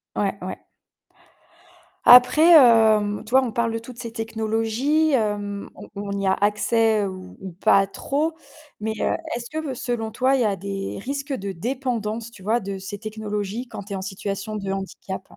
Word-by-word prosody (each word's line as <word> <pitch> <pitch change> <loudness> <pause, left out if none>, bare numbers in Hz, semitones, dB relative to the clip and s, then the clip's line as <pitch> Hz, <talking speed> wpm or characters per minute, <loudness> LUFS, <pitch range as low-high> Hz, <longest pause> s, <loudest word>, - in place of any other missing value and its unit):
Ouais. - - -1
Ouais - - -4
ouais. - - -6 1.5
Après 255 +7 +8
hem, 220 -7 +6
tu 220 - -12
vois, 265 +1 +5
on 235 -3 -3
parle 230 0 0
de 225 - -2
toutes 235 +1 -12
ces 230 -2 -6
technologies 225 +7 0
hem, 205 -4 -1
on - - -12
on 200 0 -4
y 195 - -1
a 190 - +4
accès 210 +1 +2
ou 185 -1 -8
ou 190 -2 -7
pas 195 +1 +3
trop, 300 +10 -2 0.5
mais 220 +1 -2
heu, - - +1 0.2
est-ce 240 0 -7
que 310 -4 -4
selon 235 -3 -3
toi, 260 +4 +2
il - - 0
y - - +2
a 200 -2 +1
des 195 +1 -5
risques 280 +4 -4
de 200 -4 -4
dépendance, 230 +1 -3
tu 205 -5 -15
vois, 225 +4 +1
de 195 0 -5
ces 200 +2 -7
technologies 215 +2 -4
quand 200 - -7
tu 200 - -9
es - - -2
en 190 - -5
situation 200 +2 -4
de 195 -2 -4
handicap? 190 0 -5
220 Hz, 185 wpm, -23 LUFS, 200-245 Hz, 1.5 s, Après